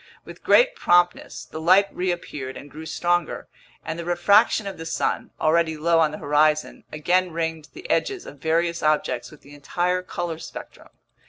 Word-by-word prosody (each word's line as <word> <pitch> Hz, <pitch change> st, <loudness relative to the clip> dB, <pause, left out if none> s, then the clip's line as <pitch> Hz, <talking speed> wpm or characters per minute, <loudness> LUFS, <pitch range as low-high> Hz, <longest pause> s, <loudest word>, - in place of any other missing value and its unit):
With -, -, -12 dB
great -, -, +4 dB
promptness, 175 Hz, -, +1 dB
the 160 Hz, -, -8 dB
light 185 Hz, +5 st, +5 dB
reappeared 175 Hz, -7 st, -4 dB
and 145 Hz, -, -12 dB
grew 160 Hz, +1 st, -9 dB
stronger; 175 Hz, 0 st, -1 dB, 0.4 s
and 160 Hz, +1 st, -4 dB
the -, -, -4 dB
refraction 200 Hz, +6 st, +3 dB
of 195 Hz, -4 st, -6 dB
the 165 Hz, -, -6 dB
sun, -, -, -2 dB
already 160 Hz, 0 st, +2 dB
low 165 Hz, +2 st, +2 dB
on 160 Hz, -1 st, +4 dB
the 155 Hz, -, -7 dB
horizon, 150 Hz, +1 st, +1 dB
again 180 Hz, +4 st, +1 dB
ringed 160 Hz, -1 st, -3 dB
the -, -, -10 dB
edges 385 Hz, -3 st, -1 dB
of 145 Hz, -, -11 dB
various 170 Hz, +3 st, 0 dB
objects 150 Hz, -5 st, 0 dB
with 150 Hz, -, -16 dB
the 145 Hz, -, -16 dB
entire 175 Hz, +6 st, -1 dB
color 175 Hz, -3 st, -5 dB
spectrum. -, -, -10 dB
165 Hz, 170 wpm, -23 LUFS, 155-175 Hz, 0.4 s, light